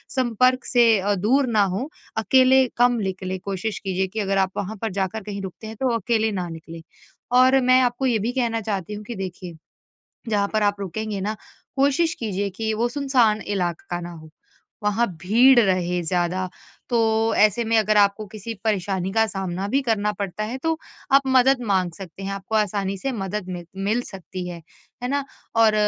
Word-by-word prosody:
संपर्क 255 Hz, 0 st, +2 dB
से 235 Hz, -3 st, +4 dB
अ, 205 Hz, +2 st, +1 dB
दूर 250 Hz, +8 st, +2 dB
ना 215 Hz, -3 st, +3 dB
हो 255 Hz, +9 st, -3 dB, 0.3 s
अकेले 260 Hz, +3 st, +5 dB
कम 245 Hz, +1 st, +5 dB
निकलें। 190 Hz, 0 st, -3 dB
कोशिश 200 Hz, +2 st, -3 dB
कीजिए 190 Hz, -1 st, -1 dB
कि 215 Hz, +4 st, -5 dB
अगर 195 Hz, -1 st, 0 dB
आप 190 Hz, -1 st, +2 dB
वहाँ 205 Hz, +3 st, -3 dB
पर 225 Hz, -2 st, -2 dB
जाकर 195 Hz, +3 st, -2 dB
कहीं 200 Hz, -1 st, -5 dB
रुकते 195 Hz, +3 st, -8 dB
हैं 220 Hz, -, -7 dB
तो 265 Hz, -, +1 dB
अकेले 220 Hz, +1 st, +1 dB
ना 180 Hz, -3 st, -3 dB
निकलें। 165 Hz, 0 st, -9 dB, 0.6 s
और 260 Hz, +1 st, +6 dB
मैं 255 Hz, +1 st, +5 dB
आपको 245 Hz, +1 st, 0 dB
ये 235 Hz, -4 st, +2 dB
भी 225 Hz, +4 st, -1 dB
कहना 235 Hz, -3 st, 0 dB
चाहती 200 Hz, -2 st, -3 dB
हूँ 210 Hz, 0 st, -7 dB
कि 235 Hz, -, -6 dB
देखिए 180 Hz, -3 st, -7 dB, 0.7 s
जहाँ 205 Hz, -2 st, +1 dB
पर 215 Hz, -1 st, +1 dB
आप 205 Hz, 0 st, +2 dB
रुकेंगे 200 Hz, +2 st, -4 dB
ना 210 Hz, +3 st, -2 dB, 0.4 s
कोशिश 285 Hz, +5 st, +2 dB
कीजिए 200 Hz, -2 st, -2 dB
कि 220 Hz, +3 st, -2 dB
वो 235 Hz, +2 st, 0 dB
सुनसान 245 Hz, -5 st, +2 dB
इलाका 175 Hz, -3 st, -3 dB
ना 175 Hz, 0 st, -7 dB
हो 160 Hz, -1 st, -12 dB, 0.5 s
वहाँ 210 Hz, +3 st, +2 dB, 0.2 s
भीड़ 240 Hz, +7 st, +6 dB
रहे 180 Hz, -3 st, +1 dB
ज़्यादा। 180 Hz, +2 st, -1 dB, 0.4 s
तो 235 Hz, -, +2 dB, 0.4 s
ऐसे 215 Hz, +3 st, +4 dB
में 225 Hz, 0 st, +1 dB
अगर 215 Hz, 0 st, +2 dB
आपको 205 Hz, +1 st, +3 dB
किसी 215 Hz, +3 st, -7 dB
परेशानी 195 Hz, -3 st, -1 dB
का 225 Hz, 0 st, +3 dB
सामना 195 Hz, -1 st, -3 dB
भी 270 Hz, +6 st, +2 dB
करना 210 Hz, -3 st, 0 dB
पड़ता 200 Hz, +2 st, -3 dB
है 245 Hz, +5 st, -4 dB
तो 325 Hz, -1 st, 0 dB, 0.3 s
आप 275 Hz, 0 st, +7 dB
मदद 260 Hz, 0 st, +4 dB
माँग 185 Hz, -3 st, +1 dB
सकते 195 Hz, 0 st, -10 dB
हैं 195 Hz, 0 st, -3 dB
आपको 195 Hz, +2 st, -5 dB
आसानी 200 Hz, -2 st, 0 dB
से 270 Hz, +7 st, -2 dB
मदद 195 Hz, -2 st, -4 dB
मि 175 Hz, -1 st, -5 dB, 0.2 s
मिल 220 Hz, +5 st, +1 dB
सकती 185 Hz, -3 st, -7 dB
है, 170 Hz, -2 st, -8 dB, 0.4 s
है 245 Hz, -, -2 dB
ना? 280 Hz, 0 st, 0 dB, 0.3 s
और 225 Hz, -1 st, +5 dB
210 Hz, 190 wpm, -23 LUFS, 190-235 Hz, 0.7 s, आप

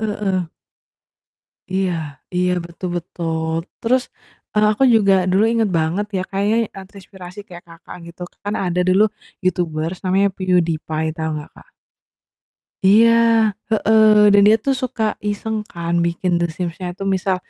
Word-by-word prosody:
Heeh 210 Hz, -1 st, -2 dB
heeh. 190 Hz, -3 st, 0 dB, 1.3 s
Iya, 190 Hz, 0 st, 0 dB, 0.4 s
iya 180 Hz, 0 st, +1 dB
betul 170 Hz, +2 st, -7 dB
betul. 165 Hz, -2 st, -3 dB, 0.3 s
Terus, 250 Hz, +2 st, +2 dB, 0.5 s
eee, 210 Hz, 0 st, +3 dB
aku 215 Hz, -, -3 dB
juga 200 Hz, -3 st, +4 dB, 0.2 s
dulu 195 Hz, +3 st, +3 dB
inget 225 Hz, -2 st, +1 dB
banget 165 Hz, +6 st, -1 dB
ya, 185 Hz, -, -1 dB
kayaknya, 200 Hz, +3 st, 0 dB, 0.2 s
eee, 195 Hz, -, -9 dB
terinspirasi 190 Hz, -1 st, -13 dB
kayak 175 Hz, -1 st, -12 dB
Kakak 165 Hz, +1 st, -12 dB
gitu, 170 Hz, +1 st, -11 dB, 0.2 s
kan 205 Hz, +1 st, -2 dB
ada 180 Hz, 0 st, 0 dB
dulu 190 Hz, +3 st, +4 dB, 0.4 s
YouTubers 170 Hz, -1 st, -1 dB
namanya 190 Hz, +2 st, +2 dB
PewDiePie 165 Hz, -4 st, 0 dB
tau 160 Hz, 0 st, -2 dB
nggak, 150 Hz, -, -8 dB
Kak? -, -, -18 dB, 1.2 s
Iya, 220 Hz, +4 st, +6 dB, 0.6 s
heeh, 220 Hz, 0 st, +4 dB, 0.3 s
dan 205 Hz, -, +6 dB
dia 215 Hz, +1 st, +6 dB
tuh 275 Hz, -, +2 dB
suka 240 Hz, -3 st, -3 dB, 0.3 s
iseng 220 Hz, +2 st, -3 dB
kan 170 Hz, 0 st, -4 dB
bikin 175 Hz, +2 st, -2 dB
The -, -, +1 dB
Sims-nya 180 Hz, 0 st, -5 dB
itu 195 Hz, -, -6 dB
misal, 190 Hz, 0 st, 0 dB
185 Hz, 145 wpm, -19 LUFS, 170-205 Hz, 1.3 s, Iya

